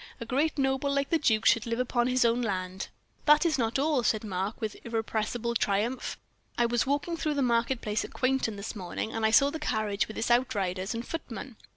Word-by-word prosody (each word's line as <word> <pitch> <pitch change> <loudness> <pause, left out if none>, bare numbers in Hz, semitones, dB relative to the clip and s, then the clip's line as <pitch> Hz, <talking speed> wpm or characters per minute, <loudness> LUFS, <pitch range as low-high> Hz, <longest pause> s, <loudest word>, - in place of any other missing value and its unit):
"A 230 - -5
great 290 +7 0
noble 270 0 +1
like 280 0 0
the 330 - +3
duke 220 -7 +2
should 230 0 +4
live 230 0 -1
upon 245 -1 +1
his 255 -1 +3
own 235 +1 +2
land." 190 -4 -3 0.4
"That 300 +2 +6
is 310 -5 +2
not 230 +1 +1
all," 285 -1 +2
said 220 -1 +1
Mark, 195 0 -3
with 220 -2 -3
irrepressible 225 +1 -2
triumph. 225 +3 0 0.4
"I 240 - +3
was 235 +1 +1
walking 290 +5 0
through 305 -2 -1
the 280 - +1
market 235 +1 +1
place 210 0 -1
at - - -7
Quainton 255 -4 0
this 200 +2 -6
morning, 195 +3 -4
and 225 - -2
I 220 - +4
saw 275 +5 +5
the 320 - -5
carriage 215 -8 0
with 225 +2 -2
out 240 0 +3
riders 190 +1 -2
and 230 +1 -4
footmen. 260 -5 -6
235 Hz, 215 wpm, -29 LUFS, 215-265 Hz, 0.4 s, That